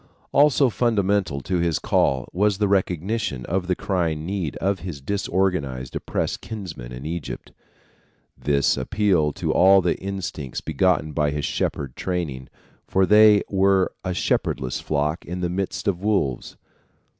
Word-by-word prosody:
Also 140 -2 +4
fundamental 100 - +1
to 90 +6 -1
his 85 -3 +1
call 65 -2 +1
was 100 +1 +2
the 105 0 +1
recognition 95 - -1
of 90 0 -2
the 90 - +1
crying 85 -6 -1
need 90 -5 -3
of 95 0 0
his 85 -4 -6
disorganized, 85 -6 -1
oppressed - - -2
kinsmen 85 - -7
in 60 +3 -8
Egypt. 85 -1 -5 0.8
This 70 -2 +1
appealed 85 -1 +1
to - - -1
all 95 +2 +6
the 90 -2 0
instincts 90 -8 -5
begotten 80 0 +1
by 75 -1 +1
his 75 0 -2
shepherd 70 -3 -2
training; 75 -8 -3 0.4
for 95 0 +3
they 105 0 +6
were 95 -1 +2
a 95 -1 -2
shepherdless 65 -7 -1
flock 75 +3 -1
in 90 +1 -5
the 90 - 0
midst 95 +1 -3
of 90 -3 0
wolves. 95 - -1
90 Hz, 145 wpm, -23 LUFS, 75-100 Hz, 0.8 s, all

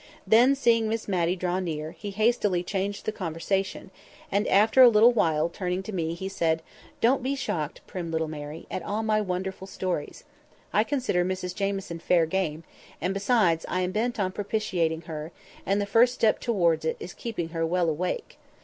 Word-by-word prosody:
Then, 245 +5 +5
seeing 230 -4 +3
Miss 225 0 -2
Matty 180 -2 +1
draw 180 0 -1
near, 155 -4 -3
he 205 - -7
hastily 205 -3 +1
changed 200 +2 -3
the - - 0
conversation, 190 +1 -3 0.4
and 205 +1 +1
after 220 +6 +5
a 250 - +10
little 225 +2 +6
while, 160 -8 +2
turning 180 +2 -3
to 215 - -7
me, 165 -2 -2
he 190 +3 -5
said, 165 -4 0 0.4
"Don't 260 +4 +4
be 265 +3 -1
shocked, 160 - -3
prim 175 -3 -5
little 160 0 -1
Mary, 150 +1 -7
at - - -3
all 210 +2 -2
my 215 -1 +2
wonderful 190 0 -4
stories. 180 -6 -4 0.5
I 210 - +4
consider 250 -9 0
Mrs 185 0 -3
Jamieson 195 -3 -3
fair 170 0 +3
game, 160 -2 -2 0.4
and 180 +3 -1
besides 195 -5 +2
I 185 - 0
am 180 0 -1
bent 235 +3 -1
on 185 -2 0
propitiating 185 -6 -1
her, 155 -1 -7 0.4
and 195 +1 +2
the 205 - 0
first 235 +5 +4
step 220 -3 +2
towards 170 -9 +1
it 160 - -1
is 175 - -7
keeping 215 -8 -4
her 165 0 -2
well 175 +1 +1
awake. 180 - -3
190 Hz, 185 wpm, -27 LUFS, 170-215 Hz, 0.5 s, a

